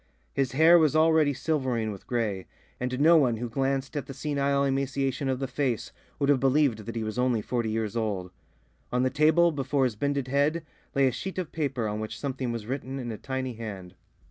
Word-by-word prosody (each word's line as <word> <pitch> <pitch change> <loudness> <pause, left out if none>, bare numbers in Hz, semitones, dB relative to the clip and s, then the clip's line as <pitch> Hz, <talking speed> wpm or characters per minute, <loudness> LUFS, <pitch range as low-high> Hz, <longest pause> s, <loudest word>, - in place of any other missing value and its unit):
His 135 -2 0
hair 165 +5 +7
was 155 -2 +3
already 160 -2 +4
silvering 130 -6 -1
with 100 - -10
grey, 105 -6 -2 0.3
and 125 +1 -2
no 165 +3 +6
one 125 -7 +3
who 120 +2 -3
glanced 135 +3 -1
at 145 - -3
the 135 - -8
senile 140 -1 0
emaciation 135 0 -1
of 130 - 0
the 135 - -2
face 130 -3 -2 0.3
would 140 - 0
have 140 -2 +4
believed 135 -5 +2
that 115 - -5
he 115 - -2
was 110 +2 -3
only 125 -4 +1
forty 120 -2 -1
years 110 0 -2
old. 100 -5 -2 0.6
On 125 +1 +1
the 130 - +1
table, 160 +4 +4
before 135 -1 0
his 125 -4 0
bended 140 +3 -1
head, 145 +4 +1 0.3
lay 135 -1 +4
a - - +2
sheet 190 +10 -6
of 180 -4 -3
paper 135 -7 -1
on 105 0 -3
which 110 0 -5
something 130 -3 -3
was 115 -3 -5
written 130 +2 -4
in 120 -3 -4
a 110 - -5
tiny 130 -1 -3
hand. 100 -5 -7
130 Hz, 210 wpm, -27 LUFS, 115-140 Hz, 0.6 s, hair